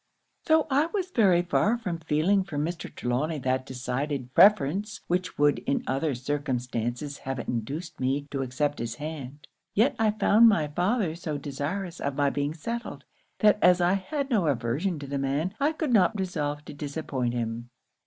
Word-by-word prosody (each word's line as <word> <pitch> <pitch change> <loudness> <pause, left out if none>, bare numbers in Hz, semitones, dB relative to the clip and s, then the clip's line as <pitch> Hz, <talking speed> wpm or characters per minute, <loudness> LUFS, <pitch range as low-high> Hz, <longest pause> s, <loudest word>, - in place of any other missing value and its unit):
'Tho' 315 -1 +4
I 285 +4 +3
was 370 0 -3
very 190 - +4
far 210 +6 +2
from 180 -8 -4
feeling 165 +5 +2
for 170 -6 -6
Mr. 165 +4 -3
Trelawny 140 +6 -1
that 130 +1 0
decided 130 +1 -3
preference 200 +1 +4
which 180 +1 -2
would 145 0 +3
in 140 - +1
other 135 +2 0
circumstances 125 0 -3
have 135 0 -4
induced 135 +9 -4
me 135 +2 0
to 135 - -2
accept 145 +3 -1
his 115 0 -3
hand, 145 -1 -7 0.3
yet 240 +7 +3
I 220 -1 +4
found 215 +2 +5
my 160 -8 +2
father 180 +3 0
so 160 -3 -4
desirous 155 +6 -4
of 140 -1 -2
my 140 -1 +2
being 145 +2 -2
settled, 235 +9 -5 0.4
that 210 -1 +5
as 180 0 +6
I 175 +1 +3
had 280 +8 -2
no 200 -9 +2
aversion 140 +7 0
to 145 - -7
the 140 0 -3
man, 140 +7 -1
I 285 +2 +3
could 310 -5 -2
not 210 0 +4
resolve 150 -5 -2
to - - -8
disappoint 140 -4 -3
him. 115 0 -3
150 Hz, 175 wpm, -27 LUFS, 135-195 Hz, 0.4 s, as